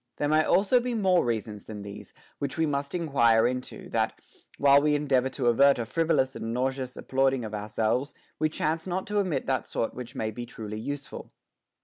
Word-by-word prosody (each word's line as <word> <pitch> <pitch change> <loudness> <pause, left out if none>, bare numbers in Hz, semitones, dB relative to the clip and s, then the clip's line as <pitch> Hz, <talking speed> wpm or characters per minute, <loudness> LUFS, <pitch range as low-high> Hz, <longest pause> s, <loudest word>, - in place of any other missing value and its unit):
There 145 - 0
may 155 +1 +4
also 205 +9 +4
be 245 0 -2
more 190 -5 +3
reasons 110 -3 -3
than 105 -2 -7
these, 100 0 -9 0.3
which 140 +1 -3
we 160 - +2
must 140 +1 -2
enquire 120 -9 +3
into, 125 +1 -3
that, - - -1 0.4
while 140 0 +6
we 150 0 +2
endeavor 135 -3 +1
to 130 -1 -3
avert 135 +4 +5
a 120 - -1
frivo 165 +7 +1
lous 130 -1 +1
and 115 - -4
nauseous 130 +1 -2
applauding 135 -2 +1
of 110 - -7
ourselves, 110 +6 -1 0.2
we 155 - +2
chance 160 +2 -2
not 185 +1 -2
to 210 0 0
omit 175 -9 -1
that 130 -2 -1
sort 115 - -2
which 125 -1 -8
may 110 0 -2
be 120 +2 -7
truly 110 -3 -7
useful. 145 +4 -6
135 Hz, 200 wpm, -27 LUFS, 115-155 Hz, 0.4 s, while